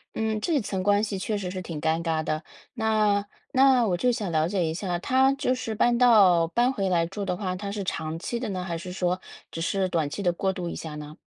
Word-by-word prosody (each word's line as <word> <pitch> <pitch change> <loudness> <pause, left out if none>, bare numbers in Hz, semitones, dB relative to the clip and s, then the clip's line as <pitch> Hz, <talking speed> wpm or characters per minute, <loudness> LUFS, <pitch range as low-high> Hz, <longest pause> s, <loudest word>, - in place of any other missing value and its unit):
嗯， 220 -1 -1
这 320 -5 +1
层 190 -3 -3
关 205 +2 +3
系 200 -3 -2
确 210 +2 -2
实 185 -2 -4
是 185 - -5
挺 165 -4 -6
尴 160 +2 0
尬 160 -2 -1
的。 155 +1 -2 0.3
那 215 -3 +1 0.2
那 260 -2 +5
我 180 -4 0
就 250 +7 +2
想 215 -7 -3
了 155 0 +2
解 190 -4 0
一 160 - -1
下， 180 0 -2
她 260 +8 +3
就 265 -2 0
是 230 -3 -4
搬 240 +3 +3
到 195 -9 +6
搬 240 +9 +1
回 195 -4 -1
来 170 -2 +2
住 200 +4 -5
的 180 -2 -2
话， 185 -3 -2
她 200 +1 -5
是 205 -1 -3
长 160 -3 -3
期 235 +7 -4
的 235 -3 -3
呢， 185 -2 -3
还 175 -2 -3
是 180 +1 -7
说 180 0 -1 0.3
只 165 - -5
是 190 +3 0
短 160 -5 0
期 200 - -5
地 175 - +3
过 190 +2 -1
渡 180 -3 -5
一 - - -5
下 155 -2 -6
呢？ 150 +1 -9
190 Hz, 270 characters per minute, -26 LUFS, 170-220 Hz, 0.3 s, 到